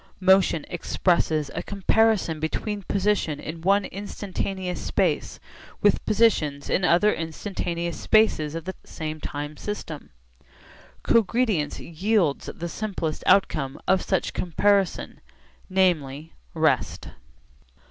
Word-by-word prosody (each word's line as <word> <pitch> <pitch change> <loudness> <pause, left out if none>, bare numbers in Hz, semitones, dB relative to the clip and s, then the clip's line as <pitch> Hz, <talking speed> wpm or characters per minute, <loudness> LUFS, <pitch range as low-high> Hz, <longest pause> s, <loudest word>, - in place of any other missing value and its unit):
Motion 185 -4 +4
expresses 165 -3 0
a - - -3
comparison 200 -4 +1
between 205 +6 -3
position 195 -6 0
in 160 +1 -7
one 195 +3 +3
instantaneous 195 -2 -4
space - - 0 0.4
with 205 - +3
positions 180 -11 +2
in 190 - +1
other 180 +5 +4
instantaneous 170 +1 -4
spaces 165 -9 +2
of 165 0 -5
the 190 - -4
same 155 -1 -6
time 145 +1 -5
system. 165 -7 -6 0.9
Cogredience 220 -8 +2
yields 175 -2 0
the 170 - -6
simplest 170 -5 -4
outcome 150 -8 +2
of 190 -1 +4
such 190 - -1
comparison, 195 +2 0 0.5
namely, 160 -6 0 0.2
rest. - - +1
180 Hz, 105 wpm, -25 LUFS, 155-205 Hz, 0.9 s, Motion